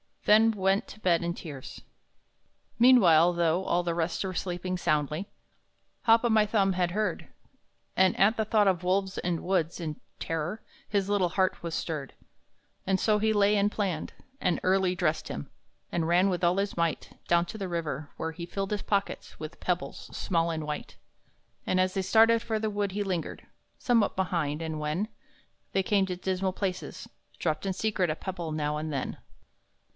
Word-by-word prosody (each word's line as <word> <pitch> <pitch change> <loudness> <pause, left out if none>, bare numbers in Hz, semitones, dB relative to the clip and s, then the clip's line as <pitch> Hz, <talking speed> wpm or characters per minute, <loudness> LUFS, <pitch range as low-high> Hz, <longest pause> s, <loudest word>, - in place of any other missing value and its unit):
Then 220 +2 +6
went 195 -1 +1
to 215 - -11
bed 175 -4 +2
in 170 0 -1
tears. 145 -7 -9 1.0
Meanwhile, 180 -9 +6
though 170 +2 +1
all 175 +1 +1
the 170 -1 -1
rest 165 +2 -1
were 190 -1 -3
sleeping 180 0 -3
soundly, 155 +2 0 0.8
Hop 230 0 +5
o' 240 - +2
my 220 -1 +4
Thumb 200 -2 +2
had 180 -1 0
heard, 215 +3 -2 0.7
And 190 0 +3
at 210 +4 +4
the 220 - +1
thought 210 -1 +3
of 180 -2 +1
wolves 190 +1 0
and 175 -2 -1
woods, 175 -3 0
in 155 -3 -5 0.2
terror 165 +6 -3 0.3
His 200 -1 0
little 200 -4 +2
heart 185 +2 0
was 170 -1 -4
stirred; 150 -5 -4 0.7
And 190 0 +2
so 215 -1 +2
he 220 +1 +2
lay 205 0 +4
and 205 0 +2
planned; 190 -8 -2 0.3
and 180 -3 +1
early 185 -1 +2
dressed 165 -3 0
him, 140 - -6 0.4
And 165 -2 0
ran 180 +3 +4
with 180 -2 -2
all 175 +2 +3
his 200 -1 -1
might 170 -1 -2
Down 170 0 +3
to 220 - -7
the 195 -3 -4
river, 155 -4 -3
where 160 - -3
he 170 +1 -7
filled 195 +3 -4
his 205 -1 -1
pockets 200 -1 -2
With 155 +2 -8
pebbles 180 -1 -3
small 170 -2 0
and 160 -2 -3
white. 150 0 -6 0.7
And, 185 - +2
as 185 0 +2
they 195 - 0
started 225 +4 +5
for 225 -2 -2
the 215 0 -1
wood, 205 -2 -1
he 205 +1 -1
lingered 185 -4 -4 0.3
Somewhat 235 -4 +2
behind, 165 -5 -1
and 160 -1 -4
when 155 +8 -2 0.6
They 195 - +2
came 195 0 +2
to 180 - -3
dismal 185 +1 -1
places, 185 -2 -4 0.3
dropped 155 +2 -1
in 190 - 0
secret 195 -3 0
A 155 - 0
pebble 175 -3 -5
now 150 -1 -1
and 155 +1 -4
then. 135 - -3
185 Hz, 180 wpm, -28 LUFS, 165-200 Hz, 1.0 s, Then